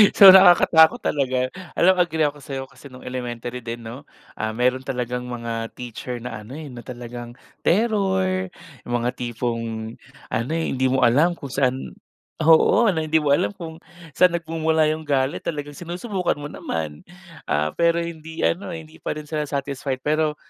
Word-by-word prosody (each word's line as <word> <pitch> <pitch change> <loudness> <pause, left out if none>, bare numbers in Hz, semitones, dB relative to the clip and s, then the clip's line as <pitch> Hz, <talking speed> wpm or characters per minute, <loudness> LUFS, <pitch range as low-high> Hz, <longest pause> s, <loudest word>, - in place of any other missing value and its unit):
So, 200 - +10
nakakatakot 175 -4 +8
talaga. 130 -3 0 0.3
Alam 185 +1 +6
mo, 180 - +4
agree 160 -3 0
ako 145 0 -6
sa'yo 135 -1 -5
kasi 135 +1 -15
nung 130 - -12
elementary 125 -1 -5
din 115 +1 -5
'no, 115 +4 -9 0.3
ah, 110 0 -2
meron 125 +3 0
talagang 125 -2 -3
mga 115 -2 -5
teacher 125 0 -7
na 115 -3 -7
ano, 110 - -13
eh, 155 - -8
na 125 -2 -10
talagang 120 -1 -8 0.3
terror, 190 -3 +1 0.3
mga 120 0 -1
tipong 115 -2 -4 0.3
ano, 115 +5 -2
eh, 165 0 0
hindi 130 0 0
mo 130 - +2
alam 135 +8 +4
kung 165 -5 -7
saan 130 0 -1 0.5
oo, 165 +8 +5
na 160 - -1
hindi 160 0 +2
mo 145 - +2
alam 180 +7 +2
kung 165 -3 -8 0.3
saan 180 +2 +4
nagmumula 160 -1 +1
yung 155 0 -5
galit, 135 +2 +1
talagang 145 -2 -4
sinusubukan 180 +4 -3
mo 145 0 -7
naman. 80 -2 -5 0.4
Ah, 75 +1 0
pero 170 0 +2
hindi 160 -1 -6
ano, 195 +4 0
hindi 160 -1 -11
pa - - -3
rin 150 - -6
sila 150 -1 -1
satisfied. 140 -2 -3
Pero 155 0 +1
140 Hz, 165 wpm, -23 LUFS, 125-165 Hz, 0.5 s, So